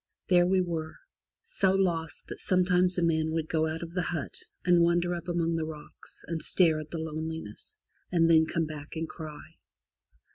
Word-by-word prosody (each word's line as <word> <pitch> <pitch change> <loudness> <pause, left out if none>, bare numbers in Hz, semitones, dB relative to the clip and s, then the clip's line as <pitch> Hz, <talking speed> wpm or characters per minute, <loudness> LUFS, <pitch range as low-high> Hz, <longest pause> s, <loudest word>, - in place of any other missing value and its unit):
There 175 -1 +5
we 190 0 +3
were, 165 -3 -3 0.5
so 195 - +1
lost 170 -4 -1
that - - -8
sometimes 180 0 +2
a 175 - +1
man 160 -1 +2
would 160 -1 -2
go 160 0 +1
out 160 +1 -4
of 170 0 -8
the 180 - 0
hut 170 -5 -3 0.3
and 175 -1 +5
wander 170 +1 +2
up 170 0 -6
among 170 -1 0
the 160 - -1
rocks, 155 -1 -10
and 165 -1 -3
stare 160 0 +3
at 155 0 -8
the 170 - -5
loneliness, 160 -7 -6 0.3
and 165 -2 +4
then 160 -1 +5
come 165 0 0
back 150 0 -8
and 160 0 -2
cry. 155 -3 -10
165 Hz, 185 wpm, -29 LUFS, 160-175 Hz, 0.5 s, There